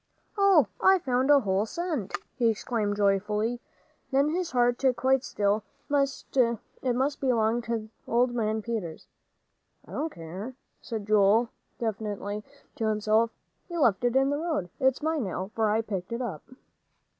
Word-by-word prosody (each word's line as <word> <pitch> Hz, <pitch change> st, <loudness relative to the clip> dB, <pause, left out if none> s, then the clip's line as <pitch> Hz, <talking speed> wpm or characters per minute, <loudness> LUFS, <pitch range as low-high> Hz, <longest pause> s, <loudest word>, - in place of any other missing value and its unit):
"Oh, 395 Hz, -7 st, +5 dB, 0.2 s
I've 380 Hz, -2 st, +5 dB
found 255 Hz, +1 st, +1 dB
a 285 Hz, -1 st, +7 dB
whole 200 Hz, 0 st, 0 dB
cent!" 315 Hz, -, -3 dB, 0.2 s
he 235 Hz, -3 st, +2 dB
exclaimed 220 Hz, -2 st, -1 dB
joyfully. 210 Hz, +4 st, +1 dB, 0.5 s
Then 275 Hz, +2 st, +3 dB
his 345 Hz, +2 st, -1 dB
heart 245 Hz, -3 st, +2 dB
stood 260 Hz, -2 st, +3 dB
quite 260 Hz, +2 st, +2 dB
still. 205 Hz, -2 st, 0 dB, 0.3 s
It 265 Hz, -3 st, 0 dB
must 270 Hz, +3 st, 0 dB
belong 235 Hz, -3 st, +2 dB
to 230 Hz, -2 st, -3 dB, 0.2 s
old 240 Hz, +1 st, +2 dB
man 220 Hz, -2 st, -1 dB
Peters. 210 Hz, -9 st, -4 dB, 0.8 s
"I -, -, -15 dB
don't 320 Hz, +1 st, -2 dB
care," 185 Hz, +9 st, -7 dB, 0.3 s
said 220 Hz, -4 st, -5 dB
Joel, 215 Hz, +2 st, +4 dB, 0.3 s
defiantly, 210 Hz, -2 st, -3 dB, 0.3 s
to 220 Hz, -, 0 dB
himself, 215 Hz, +1 st, +2 dB, 0.4 s
"he 345 Hz, -, -5 dB
left 235 Hz, -, +3 dB
it 245 Hz, 0 st, +1 dB
in 270 Hz, +1 st, +4 dB
the 290 Hz, -, 0 dB
road. 310 Hz, -, -2 dB
It's 265 Hz, +1 st, +2 dB
mine, 315 Hz, -3 st, 0 dB
now, 190 Hz, +2 st, -4 dB
for 220 Hz, -2 st, +1 dB
I 220 Hz, +2 st, +2 dB
picked 195 Hz, -4 st, -5 dB
it 235 Hz, +2 st, -2 dB
up." 185 Hz, -11 st, -4 dB
235 Hz, 155 wpm, -28 LUFS, 210-265 Hz, 0.8 s, a